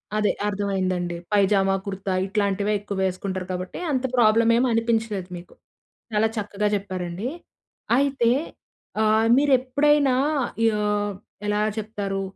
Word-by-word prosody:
అదే 210 -1 +2 0.2
అర్థమైందండి. 190 -3 -1 0.2
పైజామా, 195 -1 +3
కుర్తా 195 -1 -3
ఇట్లాంటివే 200 +1 0
ఎక్కువ 200 -1 -6
వేసుకుంటారు 185 0 -3
కాబట్టి 185 0 -5
అంత 260 -2 0
ప్రాబ్లమ్ 225 0 +5
ఏం 250 - +3
అనిపించలేదు 225 -4 -1
మీకు. 175 - -13 0.6
చాలా 215 +1 +3
చక్కగా 210 0 -1
చెప్పారండి. 185 +1 -4 0.7
అయితే 270 -4 +2 0.7
ఆహ్, 220 +1 +3
మీరు 285 +1 +3
ఎప్పుడైనా 285 +2 +2 0.7
ఆహ్, 205 0 0 0.4
ఎలా 210 0 +1 0.2
చెప్తారు 205 -2 -3
205 Hz, 110 wpm, -24 LUFS, 195-225 Hz, 0.7 s, ప్రాబ్లమ్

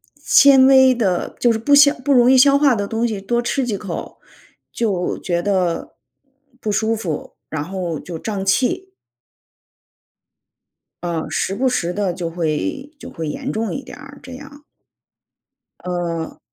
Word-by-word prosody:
纤 275 -2 +5
维 265 -1 +6
的 190 -7 -1
就 240 - +3
是 220 - -3
不 285 +6 +1
消 285 0 +7
不 285 - 0
容 245 0 +5
易 260 - +5
消 280 +2 +6
化 280 -4 +3
的 205 -2 -3
东 225 +2 -1
西 210 -3 -4
多 235 +4 -1
吃 250 +2 -1
几 210 -5 -2
口 190 -4 -7 0.5
就 195 -6 -2
觉 175 -2 -2
得 185 -3 -1 0.6
不 215 - -3
舒 220 +2 0
服， 170 -8 -5
然 155 -2 -3
后 175 -2 -4
就 170 -2 -8
胀 200 -1 -4
气。 355 - 0 2.2
嗯， 165 -3 -3
时 185 +4 -2
不 260 +5 +1
时 175 -7 -1
地 200 -3 -1
就 175 -1 -4
会 170 - -3
就 - - -9
会 160 -2 -5
严 - - -4
重 220 0 -3
一 275 - -5
点 - - -11
儿， 280 -1 -13
这 260 0 -10
样。 285 +2 -12 1.2
嗯。 170 -2 -4
215 Hz, 170 characters per minute, -19 LUFS, 175-265 Hz, 2.2 s, 消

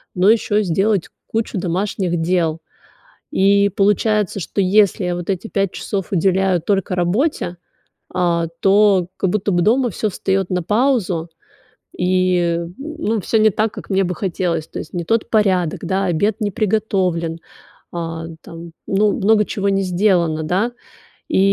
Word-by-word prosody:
но 190 +4 +5
ещё 210 -2 +1
и 215 - +3
сделать 195 +1 0 0.2
кучу 220 -3 -2
домашних 180 0 -1
дел. 165 -1 0 0.7
И 200 +1 +4
получается, 205 0 +1
что 200 +3 -2
если 200 0 +3
я 180 - -1
вот 175 +1 -6
эти 190 +4 -4
5 195 -3 -1
часов 195 -2 -4
уделяю 185 0 +2
только 195 0 0
работе, 180 - 0 0.6
а, 170 -2 +1
то 195 -2 +4
как 190 - 0
будто 205 -1 0
бы 175 - +2
дома 240 +4 +2
всё 215 +4 -2
встаёт 190 -1 -1
на 180 -1 0
паузу, 205 -6 +1 0.7
и, 180 -2 +1 0.2
ну, 285 -7 -3
всё 225 - +1
не 215 0 +5
так, 215 +2 -1
как - - -10
мне 195 0 +2
бы 180 0 -2
хотелось. 170 -3 -2
То - - -7
есть 155 - -8
не 175 -1 -2
тот 225 +5 0
порядок, 190 -7 +1
да, 190 +2 -1
обед 200 +6 0
не 205 - 0
приготовлен, 190 -6 0 0.5
а, 165 -1 -4 0.2
там, 165 0 -10 0.2
ну, 205 +1 +2
много 210 +1 +3
чего 200 0 -2
не 195 0 +1
сделано, 175 -4 +1
да. 195 +9 0 0.6
И - - +1
190 Hz, 155 wpm, -19 LUFS, 175-210 Hz, 0.7 s, но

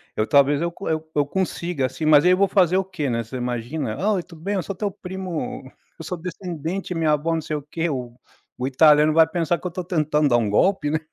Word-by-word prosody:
eu 110 - +1
talvez 140 +3 +4
eu 170 0 -2
eu 160 -1 +1
co 160 0 -25
eu 145 - +3
consiga 175 -4 -2
assim, 135 +5 -4
mas 155 0 +6
aí 180 - +6
eu 185 - +4
vou 200 +1 +3
fazer 185 -2 +3
o 190 - +2
quê, 180 -6 -4
né? 115 -1 -1
Você 115 +4 -7
imagina, 125 +1 -3
ah, 210 +3 +2
"Oi 185 -3 -1
tudo 165 -3 -15
bem? 200 +4 -2
Eu 185 - -1
sou 180 - -5
teu 205 +2 -2
primo, 180 -8 -6 0.3
eu - - -7
sou 180 +3 -4
descendente 180 +1 -5
minha 160 -2 +2
vó, 165 +3 -1
não 160 - -2
sei 155 0 -4
o 150 - -3
quê", 160 +4 -3
o 125 -4 -5 0.4
o 125 - -2
italiano 150 +2 +5
vai 160 0 +6
pensar 170 0 0
que - - -17
eu - - -6
tô 180 +2 -5
tentando 155 -4 +1
dar 120 - +4
um 115 -3 0
golpe, 150 - +2
né. 155 - +1
160 Hz, 260 wpm, -22 LUFS, 145-180 Hz, 0.4 s, mas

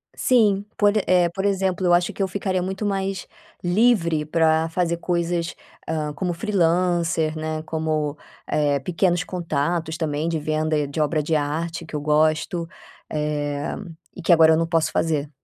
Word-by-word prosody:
Sim, 210 -5 +3
por 205 0 +3
e 210 - +1
eh, 180 -2 +3
por 195 +3 -4
exemplo, 190 -2 0
eu 175 - +4
acho 175 0 +3
que 195 - -2
eu - - +1
ficaria 185 -1 -1
muito 190 +3 -3
mais 195 -2 -2 0.4
livre 175 -5 +2
pra 160 0 +2
fazer 170 0 0
coisas, 170 0 -1 0.3
hã, 155 -2 -2
como 180 +2 -2
freelancer, 170 -4 +1
né, 155 0 -3
como, 155 -2 -2 0.3
eh, 145 -2 +1
pequenos 175 +3 0
contatos 165 -2 -2
também 155 -1 -1
de 160 -2 -1
venda, 155 -1 0
de 145 +3 -5
obra 150 +1 +1
de 155 +2 -1
arte, 165 +3 -2
que 155 - -8
eu 145 - -2
gosto, 155 +3 +1 0.4
eh, 145 -1 -2 0.4
e 185 - -8
que 170 +1 +4
agora 160 -1 +6
eu 160 - +3
não 165 - +1
posso 165 -2 +1
fazer. 150 -3 0
165 Hz, 165 wpm, -23 LUFS, 155-180 Hz, 0.4 s, agora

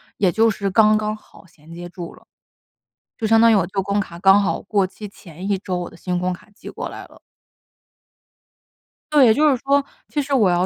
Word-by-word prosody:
也 190 -3 +1
就 225 +3 +3
是 200 -2 -2
刚 215 +2 +4
刚 215 0 -2
好 210 - -20
衔 165 -2 -17
接 175 +1 -8
住 175 -1 -9
了。 - - -21 0.9
就 225 - -3
相 225 +1 +4
当 230 0 +6
于 225 - +5
我 190 -4 +2
旧 195 +1 -2
工 200 +1 -1
卡 170 -3 -9
刚 195 +2 +5
好 - - -1
过 200 -1 0
期 195 +3 -9
前 185 -1 -10
1 200 - +1
周， 185 -2 -4
我 175 - -5
的 - - -16
新 180 +1 -3
工 180 0 -1
卡 180 - -14
寄 - - -11
过 - - -6
来 - - -9
了。 - - -20 1.9
对， 270 -7 +6
就 300 +6 +3
是 270 - +2
说， 280 +3 +1 0.2
其 295 - -2
实 280 +1 -4
我 220 -8 +4
要 175 +1 +1
200 Hz, 230 characters per minute, -20 LUFS, 180-220 Hz, 1.9 s, 当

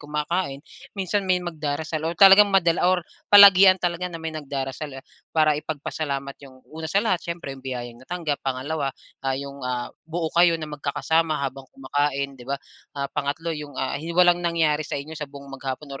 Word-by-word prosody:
kumakain, 150 0 -3 0.3
minsan 195 0 -1
may 185 - +4
magdarasal 155 -1 -3
o 170 - -4
talagang 195 +2 +8
madala 180 -3 +3
or 185 -2 +1 0.2
palagian 195 -2 +9
talaga 180 0 -2
na 170 - -7
may 160 -1 -5
nagdarasal, 140 -1 -5
eh. 135 - -11 0.2
Para 155 -1 +3
ipagpasalamat 145 -2 -4
'yong 130 -2 -15
una 160 0 -6
sa 200 +6 +1
lahat 185 -6 +1
siyempre 170 -5 -5
'yong 135 - -11
biyayang 120 -2 -6
natanggap, 155 0 -3
pangalawa, 135 +3 -2 0.3
ah, 135 -1 -1
'yong, 140 0 -7
ah, 125 -1 -3 0.2
buo 160 -1 -3
kayo 170 -1 +5
na 155 -2 -7
magkakasama 150 +2 0
habang 135 -1 -6
kumakain, 140 +1 -2
'di 130 -2 -14
ba? 140 - 0 0.4
Ah, 140 0 -3
pangatlo 145 +3 -2
'yong, 150 -3 -7
ah, 130 - -2
hi 165 - -7
walang 175 -1 +5
nangyari 165 -3 +1
sa 145 - -4
inyo 145 +3 -7
sa 150 -2 -6
buong 140 -1 -12
maghapon 135 +1 -6
150 Hz, 180 wpm, -24 LUFS, 140-170 Hz, 0.4 s, palagian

